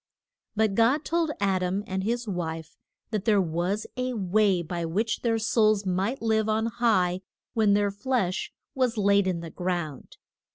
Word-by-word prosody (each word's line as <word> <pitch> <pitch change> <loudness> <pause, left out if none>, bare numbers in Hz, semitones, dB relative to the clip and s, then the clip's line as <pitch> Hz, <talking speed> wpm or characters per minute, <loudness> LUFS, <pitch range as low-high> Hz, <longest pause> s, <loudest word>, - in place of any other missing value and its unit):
But 215 -1 +2
God 245 +8 +3
told 335 -1 +1
Ad 195 -2 +1
am 185 +3 -1
and 190 0 -3
his 235 +3 -1
wife 165 -4 -4 0.4
that 215 -2 -2
there 215 -3 +4
was 180 +4 -1
a 255 0 -2
way 195 -2 +2
by 170 +1 -4
which 205 +8 -1
their 230 -2 +1
souls 215 -2 +2
might 195 +8 -1
live 220 -1 +1
on 220 +1 +1
high 210 -6 +1 0.3
when 215 -4 +3
their 205 -1 +2
flesh 205 -3 -1 0.2
was 255 -4 0
laid 200 -1 +3
in 175 -3 -1
the 165 -1 -8
ground. 175 -6 -4
205 Hz, 165 wpm, -26 LUFS, 180-225 Hz, 0.4 s, there